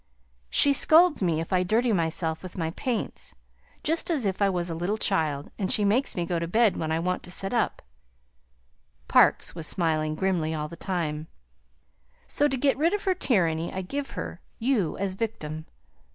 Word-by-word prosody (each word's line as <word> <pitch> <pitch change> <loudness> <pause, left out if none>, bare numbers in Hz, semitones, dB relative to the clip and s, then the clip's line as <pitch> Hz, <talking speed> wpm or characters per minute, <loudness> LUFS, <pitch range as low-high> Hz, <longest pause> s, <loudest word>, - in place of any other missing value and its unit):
She 285 - +5
scolds 320 +2 +5
me 170 -4 +1
if 165 +3 -4
I 180 - +3
dirty 225 +6 +2
myself 160 -2 0
with 185 0 -9
my 165 -2 -1
paints, 235 +5 -3 0.5
just 325 +3 -1
as 295 -9 0
if 195 0 -2
I 200 - +4
was 175 -2 -1
a 170 - -3
little 175 +6 -2
child; 155 -9 0
and 190 -2 0
she 210 - +3
makes 235 +7 +1
me 175 - -1
go 170 0 -1
to 170 - -3
bed 220 +3 +3
when 160 -1 -3
I 160 - +1
want 180 +2 -1
to - - -10
sit 195 +3 -2
up," 235 - 0 1.2
Parkes - - +4
was 165 -3 -2
smiling 155 -3 0
grimly 165 -3 0
all 150 -1 -3
the 170 - -10
time; 160 -4 -3 1.0
"so 290 - +2
to 270 -2 -2
get 270 +1 +1
rid 335 +6 +3
of 415 - -4
her 380 - +2
tyranny 170 - 0
I 190 - -4
give 275 +9 -4
her - - -5 0.2
you 225 - 0
as 195 -1 -2
victim. 160 -8 -4
185 Hz, 190 wpm, -26 LUFS, 165-235 Hz, 1.2 s, She